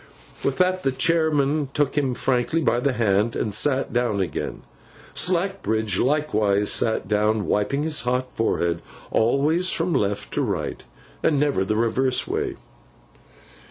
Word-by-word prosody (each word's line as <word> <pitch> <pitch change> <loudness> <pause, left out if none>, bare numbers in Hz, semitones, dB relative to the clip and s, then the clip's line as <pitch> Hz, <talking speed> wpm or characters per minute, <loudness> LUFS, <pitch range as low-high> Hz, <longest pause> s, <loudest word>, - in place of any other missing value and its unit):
With 140 - 0
that, 185 0 +2
the 135 - +1
chairman 150 -1 +1
shook 145 -2 +1
him 135 -4 0
frankly 130 +7 0
by 120 - +2
the 135 +2 0
hand, 110 -1 +1
and 105 - -2
sat 135 +4 +1
down 120 -4 0
again. 90 -6 -3 0.5
Slackbridge 170 - 0
likewise 110 -8 +1
sat 110 -4 +1
down, 105 +1 +1
wiping 140 +8 0
his 155 -1 +1
hot 125 +1 -1
forehead—always 135 - 0
from 170 +1 0
left 100 -5 -1
to - - 0
right, - - -3 0.4
and 150 -3 +2
never 140 -9 +1
the 105 +3 -1
reverse 125 +3 +1
way. - - -2
130 Hz, 135 wpm, -23 LUFS, 110-150 Hz, 0.5 s, that